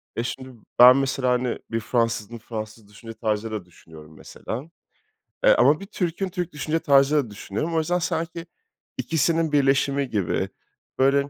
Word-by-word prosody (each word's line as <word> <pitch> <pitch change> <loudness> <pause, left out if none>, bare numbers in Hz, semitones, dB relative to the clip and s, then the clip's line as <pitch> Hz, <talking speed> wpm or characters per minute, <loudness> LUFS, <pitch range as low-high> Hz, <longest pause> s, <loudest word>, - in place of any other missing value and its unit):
E, 115 - -1
şimdi 130 +2 -5 0.3
ben 125 +2 +10
mesela, 135 -2 0
hani, 125 -1 0
bir 115 - 0
Fransız'ın 115 -1 -1
Fransız 110 -1 -8
düşünce 115 +2 -11
tarzıyla 110 -3 -3
düşünüyorum 80 -3 -15
mesela, 125 +6 -7 0.8
eee, - - +6
ama 150 - +5
bir 195 - -8
Türk'ün 190 -1 -3
Türk 180 -2 -4
düşünce 155 +2 -1
tarzıyla 140 -1 +4
da 110 - -12
düşünüyorum. 105 +11 -4
O - - +3
yüzden 175 +3 0
sanki 165 0 -3 0.5
ikisinin 165 0 +1
birleşimi 140 -1 +2
gibi, 100 -5 -1 0.5
böyle, 140 +1 +3
135 Hz, 150 wpm, -24 LUFS, 115-160 Hz, 0.8 s, ben